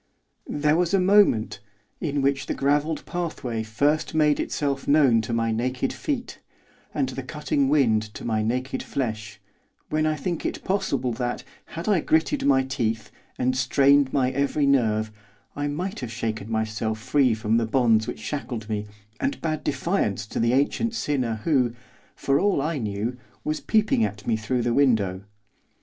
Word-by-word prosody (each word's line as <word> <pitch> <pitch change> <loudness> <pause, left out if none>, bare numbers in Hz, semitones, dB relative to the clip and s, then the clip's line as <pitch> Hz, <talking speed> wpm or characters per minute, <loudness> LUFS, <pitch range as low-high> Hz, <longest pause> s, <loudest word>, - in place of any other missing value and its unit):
There 150 +1 +1
was 180 +2 +2
a - - +3
moment, 185 - +4 0.4
in 145 -3 -1
which 140 0 +1
the - - -2
gravelled 145 +3 0
pathway 145 -10 -3
first 145 +9 0
made 150 -2 +3
itself 140 -2 -2
known 140 -6 +5
to 110 - -5
my 115 -1 +1
naked 125 +4 -1
feet, 270 -5 -4 0.5
and - - -1
the - - -5
cutting 285 -3 -1
wind 115 -7 +3
to - - -7
my 110 -2 0
naked 130 +4 -2
flesh, 110 -6 -4 0.5
when 155 0 +1
I 155 - +1
think 170 +3 -3
it - - -3
possible 185 -10 0
that, 120 +1 -3 0.2
had 165 +3 -7
I 205 -5 +4
gritted 160 0 +1
my 135 -1 +4
teeth, 115 -5 -2 0.3
and 130 +1 +1
strained 140 +2 +4
my 130 -2 +1
every 140 +2 +1
nerve, 110 -6 +2 0.4
I 145 0 -2
might 175 +7 -3
have 125 -4 -5
shaken 110 -3 -3
myself 110 0 -1
free 130 0 +2
from 110 +1 +1
the 115 -1 +1
bonds 115 -3 +3
which - - -5
shackled 120 -4 -4
me, 105 -1 -3 0.3
and 275 +1 -1
bade 155 -2 -2
defiance 135 - -1
to - - -3
the 115 +1 +2
ancient 225 - +1
sinner 125 - -1
who, 125 -7 +2 0.4
for 140 0 +1
all 200 -4 +2
I 150 +1 -1
knew, 110 +2 -3 0.3
was 155 0 -1
peeping 215 - +2
at 105 0 -3
me 115 - +1
through 120 +3 -1
the 120 0 +1
window. 105 -9 +2
130 Hz, 165 wpm, -25 LUFS, 115-150 Hz, 0.5 s, known